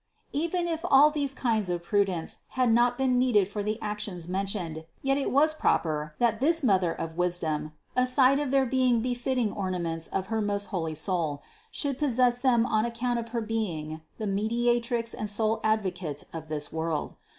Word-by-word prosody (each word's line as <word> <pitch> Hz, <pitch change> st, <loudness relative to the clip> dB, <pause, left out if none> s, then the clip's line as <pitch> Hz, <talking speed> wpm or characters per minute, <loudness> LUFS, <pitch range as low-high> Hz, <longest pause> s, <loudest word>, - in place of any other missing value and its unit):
Even 340 Hz, +4 st, 0 dB
if 325 Hz, -2 st, -1 dB
all 285 Hz, +3 st, +6 dB
these 285 Hz, -2 st, -1 dB
kinds 220 Hz, -6 st, 0 dB
of 175 Hz, -1 st, -2 dB
prudence 190 Hz, -3 st, 0 dB, 0.2 s
had 250 Hz, -3 st, +4 dB
not 240 Hz, +1 st, +3 dB
been 260 Hz, -2 st, +2 dB
needed 225 Hz, -7 st, +3 dB
for 205 Hz, +1 st, -4 dB
the 215 Hz, +2 st, -2 dB
actions 210 Hz, -5 st, -3 dB
mentioned, 185 Hz, -4 st, -3 dB, 0.2 s
yet 270 Hz, 0 st, +2 dB
it 280 Hz, -, -1 dB
was 305 Hz, +4 st, +4 dB
proper, 155 Hz, -, 0 dB
that 230 Hz, -2 st, +2 dB
this 325 Hz, +4 st, +3 dB
Mother 190 Hz, -7 st, +3 dB
of 165 Hz, 0 st, -5 dB
wisdom, 165 Hz, -4 st, -1 dB, 0.2 s
aside 255 Hz, +2 st, +4 dB
of 290 Hz, -2 st, -1 dB
their 270 Hz, 0 st, +3 dB
being 255 Hz, -2 st, +2 dB
befitting 245 Hz, -2 st, -1 dB
ornaments 175 Hz, -4 st, -2 dB
of 190 Hz, -, -2 dB
her 220 Hz, -, +1 dB
most 205 Hz, -1 st, -1 dB
holy 165 Hz, -4 st, -2 dB
soul, 160 Hz, -4 st, -2 dB, 0.3 s
should 280 Hz, -, -3 dB
possess 250 Hz, -4 st, +3 dB
them 245 Hz, -3 st, +3 dB
on 215 Hz, -3 st, +1 dB
account 235 Hz, +1 st, -1 dB
of 230 Hz, 0 st, -6 dB
her 230 Hz, 0 st, -2 dB
being 170 Hz, -9 st, -3 dB, 0.2 s
the 215 Hz, -, -4 dB
Mediatrix 235 Hz, +3 st, 0 dB
and 215 Hz, -, -4 dB
sole 215 Hz, +2 st, 0 dB
Advocate 185 Hz, -9 st, -1 dB
of 160 Hz, -1 st, -6 dB
this 150 Hz, -1 st, -5 dB
world. 160 Hz, -1 st, -2 dB
220 Hz, 175 wpm, -28 LUFS, 180-250 Hz, 0.3 s, all